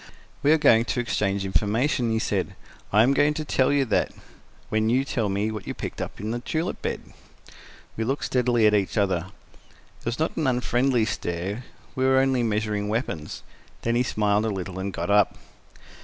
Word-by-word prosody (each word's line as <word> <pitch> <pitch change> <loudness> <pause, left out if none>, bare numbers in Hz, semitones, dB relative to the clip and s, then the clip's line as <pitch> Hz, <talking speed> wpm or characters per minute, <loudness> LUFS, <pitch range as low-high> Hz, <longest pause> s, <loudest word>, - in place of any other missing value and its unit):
"We 145 - +4
are 160 - +6
going 115 -6 +5
to 125 - -1
exchange 100 -5 0
information," 115 - +1
he 110 - +1
said 100 -5 -1 0.4
"I 105 +2 +6
am 130 +4 +4
going 145 +2 +3
to 155 - -3
tell 130 -2 +2
you 140 -1 +3
that, - - +1 0.6
when 110 0 +1
you 130 +3 +2
tell 115 -6 -1
me 100 +3 0
what 105 -3 -7
you - - -4
picked - - -5
up - - -6
in 105 +2 -3
the 120 - -2
tulip 160 +7 -3
bed." - - -5 0.8
We 110 - -2
looked 135 +5 -1
steadily 120 -3 +2
at 105 - +5
each 100 -1 +1
other: 95 -4 +1 0.7
it - - -22
was 115 +1 -1
not 160 - -1
an 155 -4 +1
unfriendly 125 -1 +2
stare; 95 +4 -3 0.3
we 130 - -1
were 130 0 +4
only 130 -1 +3
measuring 105 -2 -1
weapons. 105 - -3 0.4
Then 115 - +1
he 120 - +3
smiled 105 -3 +1
a - - 0
little 95 -2 -4
and 100 +1 -3
got 85 +2 -3
up. 105 -1 +3
110 Hz, 195 wpm, -25 LUFS, 100-130 Hz, 0.8 s, are